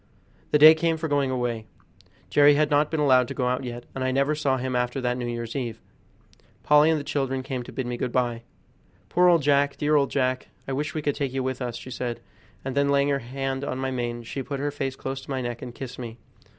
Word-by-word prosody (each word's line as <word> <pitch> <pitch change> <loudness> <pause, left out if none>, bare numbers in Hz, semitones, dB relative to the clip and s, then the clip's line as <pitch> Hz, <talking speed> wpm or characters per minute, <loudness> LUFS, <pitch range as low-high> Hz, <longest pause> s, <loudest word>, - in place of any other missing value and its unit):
The - - +4
day 155 +2 +10
came 165 0 0
for 160 0 -3
going 145 -2 +1
away. 120 -3 -2 0.6
Jerry 145 0 +6
had 150 +1 +2
not 145 +1 +3
been 160 - -2
allowed 130 -4 +4
to - - -6
go 125 -2 0
out 125 +1 0
yet, 120 -1 -6
and 130 - -3
I 130 - +1
never 140 +3 +2
saw 145 -3 +1
him 130 0 -2
after 125 +2 0
that 125 -1 0
New 125 -1 -3
Year's 120 -1 -4
eve. 120 -4 -3 0.8
Polly 150 +1 +5
and 160 -1 +2
the - - -5
children 135 -2 -2
came 130 -1 -4
to 120 - -9
bid 130 - -3
me 120 0 -3
good 120 - -2
by. 120 -2 0 0.7
"Poor 180 0 +4
old 170 -4 +5
Jack! 140 0 +3
dear 150 0 +2
old 140 -2 +3
Jack! 130 -2 0 0.2
I 135 - -2
wish 150 +4 -3
we 155 - -2
could 145 - +1
take 135 -3 -3
you 135 -1 -1
with 130 0 -3
us," 120 -2 -3
she 130 - -9
said, 120 -1 -3 0.5
and 135 -1 -3
then 140 0 +2
laying 140 0 +3
her 140 -1 +1
hand 135 +2 -4
on 130 - -3
my 130 0 -2
mane 120 -2 -3
she 135 +4 -5
put 140 0 -5
her 145 +1 -1
face 135 -2 -3
close 135 0 -5
to - - -15
my 135 -1 -1
neck 120 -1 -4
and 120 -2 -8
kissed 130 -1 -7
me. 115 -2 -7
135 Hz, 255 wpm, -25 LUFS, 125-145 Hz, 0.8 s, day